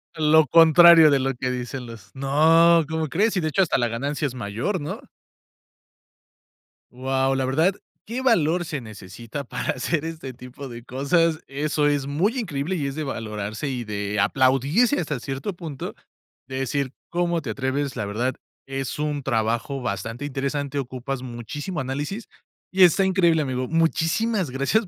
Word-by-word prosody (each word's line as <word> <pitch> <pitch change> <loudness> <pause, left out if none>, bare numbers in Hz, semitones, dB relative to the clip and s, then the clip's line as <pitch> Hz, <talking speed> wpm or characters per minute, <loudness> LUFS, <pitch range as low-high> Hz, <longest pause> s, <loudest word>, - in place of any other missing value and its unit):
Lo 155 0 +4
contrario 165 -1 +8
de 140 - +3
lo 135 +1 0
que 130 +1 -2
dicen 125 0 -5
los 110 -3 -12
No, 160 +5 +5
¿cómo 160 -1 -1
crees? 200 - +1
Y, - - +3
de 155 -2 -1
hecho, 195 - +2
hasta 175 - +2
la 120 -1 +1
ganancia 140 +6 -2
es 125 - -7
mayor, 120 - -3
¿no? 145 - -5 1.9
Guau, 135 +1 0
la 135 - 0
verdad, 160 +9 +2 0.3
qué 240 +4 -4
valor 175 - +2
se 150 -3 -4
necesita 110 +4 -8
para - - -3
hacer 155 +5 -1
este 160 -5 -6
tipo 125 +2 -10
de 120 0 -9
cosas, 155 +6 +1
eso 145 +2 -1
es 145 -2 0
muy 195 - 0
increíble 170 -2 -2
y 140 -2 -1
es 135 - -5
de 155 - -3
valorarse 110 -1 -4
y 125 -3 -3
de 105 -1 -3
aplaudirse, 140 - +3
hasta 150 -5 -3
cierto 135 - -4
punto, 160 -6 -7 0.5
de 130 0 -4
decir: 135 0 -2 0.2
"¿Cómo 170 -1 0
te 130 - -6
atreves?". 130 +3 -2
La 105 - -2
verdad, 120 +6 -2 0.3
es 135 +1 -4
un 150 -1 -1
trabajo 120 +2 -1
bastante 115 +4 -4
interesante, 140 0 -2
ocupas 130 0 -4
muchísimo 135 +7 -5
análisis 145 - -4 0.4
y, 190 0 +5
está 185 +3 +3
increíble, 175 -4 +3
amigo. 130 -2 -2
Muchísimas 165 - +1
gracias 140 - 0
140 Hz, 160 wpm, -24 LUFS, 125-165 Hz, 1.9 s, contrario